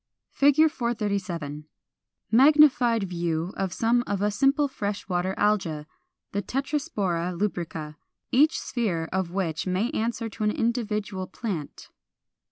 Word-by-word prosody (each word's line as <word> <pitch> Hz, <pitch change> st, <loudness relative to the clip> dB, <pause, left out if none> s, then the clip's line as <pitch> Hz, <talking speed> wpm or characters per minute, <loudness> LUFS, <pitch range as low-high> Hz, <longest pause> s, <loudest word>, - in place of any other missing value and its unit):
[Illustration: 290 Hz, +3 st, +6 dB
Fig. -, -, -18 dB
437. 195 Hz, -, -3 dB, 0.7 s
Magnified 260 Hz, -3 st, +5 dB
view 170 Hz, -1 st, -2 dB
of 190 Hz, -2 st, -2 dB
some 235 Hz, +4 st, +2 dB
of 200 Hz, 0 st, -1 dB
a 210 Hz, -, +2 dB
simple 275 Hz, +6 st, +2 dB
fresh 205 Hz, -7 st, -4 dB
water 185 Hz, 0 st, -1 dB
Alga, 185 Hz, -8 st, +1 dB, 0.5 s
the 200 Hz, -, -1 dB
Tetraspora 205 Hz, -, -2 dB
lubrica, 165 Hz, -6 st, -3 dB, 0.3 s
each 300 Hz, +5 st, +4 dB
sphere 185 Hz, -10 st, -2 dB
of 190 Hz, -2 st, 0 dB
which 175 Hz, -2 st, -2 dB
may 190 Hz, +7 st, 0 dB
answer 230 Hz, -3 st, -2 dB
to 215 Hz, 0 st, -6 dB
an 210 Hz, -, +3 dB
individual 210 Hz, -4 st, -2 dB
plant. 180 Hz, -11 st, -6 dB
205 Hz, 125 wpm, -26 LUFS, 180-240 Hz, 0.7 s, Illustration